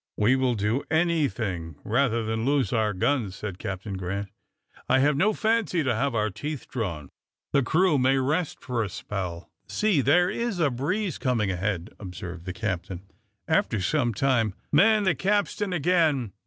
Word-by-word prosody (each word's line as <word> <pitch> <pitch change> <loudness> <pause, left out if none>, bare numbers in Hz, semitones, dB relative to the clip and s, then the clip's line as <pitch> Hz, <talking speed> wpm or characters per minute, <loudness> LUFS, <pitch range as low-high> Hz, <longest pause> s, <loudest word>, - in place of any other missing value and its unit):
"We 120 +5 +4
will 130 -2 +1
do 110 +6 0
anything 135 - 0
rather 115 0 +1
than 110 0 -2
lose 140 0 +1
our 110 -2 +2
guns," 105 0 0
said 100 -3 -6
Captain 95 +1 -5
Grant. 100 +2 -4 0.6
"I 130 - +5
have 145 +2 +3
no 190 +9 +3
fancy 215 -7 +1
to 130 -3 +1
have 130 +3 0
our 105 -1 +1
teeth 150 +7 -5
drawn. 85 - -4 0.4
The 140 - +4
crew 155 +3 +3
may 130 +1 +3
rest 150 +5 0
for 125 -3 -2
a 105 - -2
spell. 90 -2 -5 0.2
See, 210 -9 +2
there 175 +7 +4
is 235 -4 -2
a 150 -5 +3
breeze 170 - -2
coming 115 -6 +1
ahead," 90 -1 -2
observed 90 -2 -7
the 95 - -3
captain, 95 -3 -4 0.4
after 160 - +1
some 120 - +1
time. 115 -3 +1 0.2
"Man 210 +8 +5
the 190 -3 +3
capstan 205 +1 0
again. 155 - +1
125 Hz, 165 wpm, -26 LUFS, 100-155 Hz, 0.6 s, I